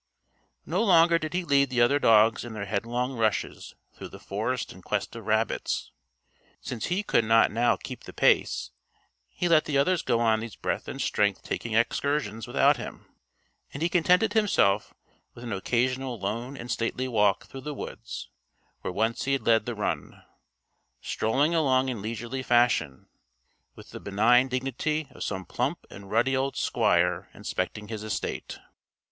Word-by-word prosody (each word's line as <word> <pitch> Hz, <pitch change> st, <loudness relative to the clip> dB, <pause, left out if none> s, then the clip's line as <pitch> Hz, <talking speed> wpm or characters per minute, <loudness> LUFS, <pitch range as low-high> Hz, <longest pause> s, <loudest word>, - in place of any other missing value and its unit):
No 185 Hz, +7 st, 0 dB
longer 170 Hz, -4 st, +5 dB
did 155 Hz, +2 st, -4 dB
he 180 Hz, -, 0 dB
lead 140 Hz, -4 st, +3 dB
the 125 Hz, -1 st, -1 dB
other 120 Hz, +5 st, +4 dB
dogs 115 Hz, -2 st, +4 dB
in 120 Hz, -1 st, -7 dB
their 105 Hz, -2 st, -5 dB
headlong 120 Hz, +6 st, -2 dB
rushes 110 Hz, -2 st, -2 dB, 0.2 s
through -, -, -9 dB
the -, -, -12 dB
forest -, -, -3 dB
in -, -, -14 dB
quest -, -, -3 dB
of -, -, -9 dB
rabbits. -, -, -1 dB, 0.7 s
Since 115 Hz, -4 st, -5 dB
he 185 Hz, +5 st, 0 dB
could 120 Hz, -, +2 dB
not 115 Hz, +1 st, +4 dB
now 120 Hz, +2 st, +2 dB
keep -, -, -9 dB
the -, -, -9 dB
pace, -, -, +2 dB, 0.6 s
he 175 Hz, -, -2 dB
let 165 Hz, -2 st, +4 dB
the 145 Hz, -3 st, 0 dB
others 170 Hz, +5 st, +2 dB
go 115 Hz, -, +1 dB
on 110 Hz, -2 st, +3 dB
these 115 Hz, -1 st, -7 dB
breath -, -, -3 dB
and -, -, -6 dB
strength -, -, +1 dB
taking 115 Hz, -2 st, -3 dB
excursions 115 Hz, -2 st, 0 dB
without -, -, +3 dB
him; -, -, -8 dB, 0.7 s
and 145 Hz, -, -3 dB
he 170 Hz, -, +2 dB
contented 180 Hz, +5 st, +3 dB
himself 105 Hz, -, +2 dB, 0.4 s
with 120 Hz, -, -11 dB
an 115 Hz, -3 st, -4 dB
occasional 125 Hz, +5 st, -1 dB
lone 115 Hz, +7 st, -4 dB
and 120 Hz, 0 st, -6 dB
stately 120 Hz, +2 st, -1 dB
walk 105 Hz, -5 st, +2 dB
through 135 Hz, -, -10 dB
the 150 Hz, +2 st, -5 dB
woods -, -, -7 dB, 0.5 s
where -, -, -4 dB
once 115 Hz, +3 st, -1 dB
he 135 Hz, -, +1 dB
had 135 Hz, -, -1 dB
led 115 Hz, -1 st, +3 dB
the 120 Hz, -, -3 dB
run 105 Hz, -, -4 dB, 0.8 s
strolling 140 Hz, +9 st, 0 dB
along 135 Hz, -5 st, +2 dB
in 120 Hz, -5 st, -4 dB
leisurely 115 Hz, +4 st, -4 dB
fashion, 120 Hz, -, +2 dB, 0.7 s
with -, -, -14 dB
the -, -, -8 dB
benign 115 Hz, +6 st, +3 dB
dignity 135 Hz, +4 st, -2 dB
of -, -, -7 dB
some 95 Hz, -2 st, -4 dB
plump 130 Hz, -, -2 dB
and 100 Hz, 0 st, -11 dB
ruddy 120 Hz, +5 st, +2 dB
old 135 Hz, +1 st, -1 dB
squire 90 Hz, -6 st, +1 dB
inspecting 105 Hz, 0 st, -4 dB
his 110 Hz, -1 st, -5 dB
estate. 110 Hz, -, -4 dB
120 Hz, 165 wpm, -27 LUFS, 110-140 Hz, 0.8 s, longer